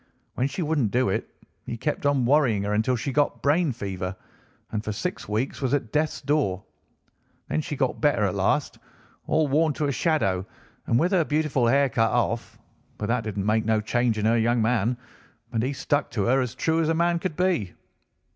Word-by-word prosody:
When 130 - 0
she 145 +6 -3
wouldn't 150 -8 +1
do 125 -1 +1
it, 95 - -2 0.4
he 115 - -4
kept 145 +3 -1
on 140 -3 +2
worrying 125 -7 +3
her 105 +1 -1
until 110 +4 +1
she 125 +4 -3
got 145 +1 +1
brain 155 +2 +3
fever, 95 -5 -4 0.6
and 105 -1 -2
for 105 - -3
six 180 - -4
weeks 110 +8 -2
was 130 +1 +1
at 120 -6 -3
death's 155 +1 0
door. 135 -11 0 0.9
Then 75 - 0
she - - -5
got - - -1
better - - +3
at - - +1
last, - - 0 0.5
all 155 -1 +2
worn 155 +2 +2
to 150 - -2
a 140 - +1
shadow, 125 - +1 0.4
and 115 - +3
with 175 +4 +2
her 185 -4 +3
beautiful 150 -5 +1
hair 140 +3 +4
cut 115 -2 +1
off; 115 -1 -1 0.4
but 105 - -4
that 115 -2 0
didn't 100 -2 -3
make 110 +1 +2
no 110 -1 +2
change 115 +1 0
in 105 - -1
her 115 +1 +3
young 120 +2 +2
man, 115 +1 +1 0.6
and 115 - +1
he 130 +4 0
stuck 145 +1 -1
to 105 - -1
her 130 +5 +3
as 125 -1 -3
true 160 +4 +1
as 160 0 +1
man 170 +1 +2
could 180 -3 -3
be." 180 - 0
125 Hz, 205 wpm, -25 LUFS, 110-150 Hz, 0.9 s, hair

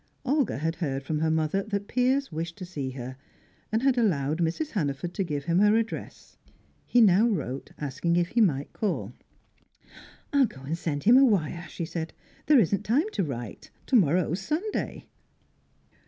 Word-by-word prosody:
Olga 280 - +1
had 160 +4 -2
heard 135 -5 -2
from 150 +2 -2
her 160 +1 +1
mother 160 +4 +1
that 200 0 -4
Piers 260 +1 +1
wished 165 +1 -4
to 185 - -6
see 145 -7 -4
her, 130 0 -7 0.5
and 220 +3 0
had 265 -2 +3
allowed 155 - +1
Mrs. 175 - -1
Hannaford 160 -2 -2
to 195 - -1
give 150 -5 -3
him 170 +1 +2
her 210 +1 +5
address; 225 0 -5 0.5
he 245 - +4
now 210 +1 +6
wrote 140 - -3
asking 150 +4 -1
if 175 0 +1
he 235 - +2
might 145 -9 +1
call. 210 -4 -2 1.2
"I'll 275 -3 +5
go 130 - -13
and 145 +4 -2
send 150 -4 -3
him 240 +4 +7
a 270 - +7
wire," 175 - +1
she 170 - -4
said. 160 -1 -5 0.3
"There 300 - +6
isn't 200 -3 +3
time 280 - +1
to 195 - -1
write. 120 - -6 0.2
To 265 - +1
morrow's 175 - +3
Sunday." 325 - -3
175 Hz, 175 wpm, -27 LUFS, 150-225 Hz, 1.2 s, him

